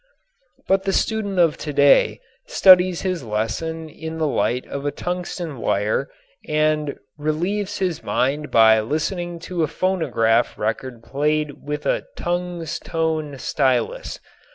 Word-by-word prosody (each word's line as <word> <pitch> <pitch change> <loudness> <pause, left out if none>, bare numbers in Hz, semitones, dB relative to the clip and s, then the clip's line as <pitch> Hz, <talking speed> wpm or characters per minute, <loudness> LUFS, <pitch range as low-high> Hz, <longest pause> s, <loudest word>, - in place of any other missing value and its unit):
But 195 0 +3
the 195 - +1
student 210 -3 0
of 170 -3 +3
today 145 -2 +3 0.3
studies 185 -2 +6
his 185 -5 -2
lesson 115 +10 -3
in 160 +1 -7
the 160 - 0
light 125 -3 0
of 140 - -6
a 145 - 0
tungsten 175 -2 -4
wire 105 +6 0 0.4
and 155 -1 +1 0.2
relieves 175 +7 -1
his 180 -4 -1
mind 135 +7 -1
by 110 -1 +6
listening 170 - -2
to 180 -2 -3
a 155 - +2
phonograph 135 -10 +1
record 115 +2 -3
played 150 +2 -1
with 150 0 -3
a - - 0
"tungs 175 -2 -3
tone" 160 -3 -2
stylus. 130 -3 -1
155 Hz, 130 wpm, -22 LUFS, 135-175 Hz, 0.4 s, studies